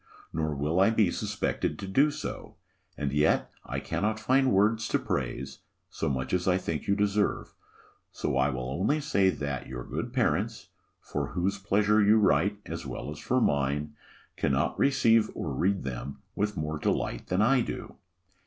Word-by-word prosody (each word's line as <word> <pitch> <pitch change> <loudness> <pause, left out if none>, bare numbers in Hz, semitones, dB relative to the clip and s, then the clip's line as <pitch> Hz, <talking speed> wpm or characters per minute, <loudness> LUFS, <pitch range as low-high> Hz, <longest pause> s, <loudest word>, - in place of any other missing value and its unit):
nor 80 -1 -1
will 75 +5 0
I 95 - +6
be 110 -5 +3
suspected - - -2
to 100 - -6
do 135 +10 +4
so; 150 -7 -6 0.4
and 70 -2 -2
yet 75 +1 +2
I - - -4
cannot 110 +1 -1
find 130 +3 +3
words 110 +3 +3
to - - +2
praise, 65 0 -3 0.3
so - - -2
much 65 -2 -2
as 90 0 0
I 90 -1 +4
think 80 -5 -4
you 100 - +3
deserve: 105 0 0 0.6
so - - -2
I 65 +1 +3
will 65 -2 -3
only 95 - 0
say 100 -11 +2
that 70 -6 -3
your 60 -1 -6
good - - -4
parents, - - 0 0.3
for - - -3
whose 95 +3 -1
pleasure 105 +2 +3
you 105 +2 +5
write, 100 0 +3
as - - -5
well 75 - -5
as 75 - -8
for 130 - +1
mine, 75 - 0 0.4
cannot 70 0 0
receive 115 -5 +4
or 75 - -3
read 95 +8 +1
them 70 +1 -6
with 105 0 -1
more 75 0 -2
delight - - -1
than 95 +3 +2
I 130 +3 +4
do. - - -5
95 Hz, 170 wpm, -28 LUFS, 70-105 Hz, 0.6 s, I